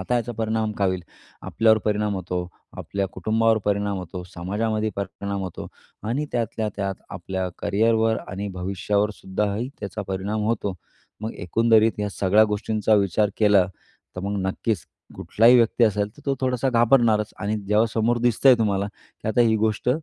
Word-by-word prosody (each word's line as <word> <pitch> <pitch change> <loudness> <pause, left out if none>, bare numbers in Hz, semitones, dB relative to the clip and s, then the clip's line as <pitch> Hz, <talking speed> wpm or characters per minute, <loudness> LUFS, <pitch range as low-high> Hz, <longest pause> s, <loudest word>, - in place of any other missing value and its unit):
आता 95 +6 -1
याचा 120 0 -2
परिणाम 110 -1 -1
काय 100 -2 0
होईल? 95 -1 -2 0.4
आपल्यावर 110 -1 +3
परिणाम 105 -1 0
होतो, 90 -1 -3 0.3
आपल्या 100 -1 -2
कुटुंबावर 110 0 +2
परिणाम 100 -1 0
होतो, 90 0 -7
समाजामध्ये 110 +4 -1
परिणाम 100 0 -4
होतो 90 -3 -6 0.4
आणि 145 +6 -1
त्यातल्या 115 -2 -1
त्यात 100 -1 -2 0.2
आपल्या 95 +1 -4
करिअरवर 110 +2 +2
आणि 100 +2 -4
भविष्यावरसुद्धाही 100 +4 -1
त्याचा 100 +1 -5
परिणाम 100 +3 -2
होतो. 105 -4 -1 0.5
मग 110 +1 -4
एकंदरीत 110 +3 +2
या 105 - -1
सगळ्या 100 +3 +4
गोष्टींचा 110 +1 +1
विचार 100 +1 +2
केला. 105 -4 +4 0.5
तर 90 - -3
मग 100 +1 -2
नक्कीचं 100 0 -2 0.3
कुठलाही 115 +3 +4
व्यक्ती 115 0 +4
असेल, 105 -1 +1
तर 145 - -16
तो 140 - +2
थोडासा 130 0 0
घाबरणारचं, 115 -3 +3
आणि 105 +2 0
जेव्हा 105 +2 +4
समोर 115 +2 +2
दिसतंय 120 +2 +5
तुम्हाला, 100 -2 +1
की 105 - -10
आता 110 - +2
ही 110 -2 +4
गोष्ट 110 +1 0
105 Hz, 155 wpm, -24 LUFS, 100-115 Hz, 0.5 s, दिसतंय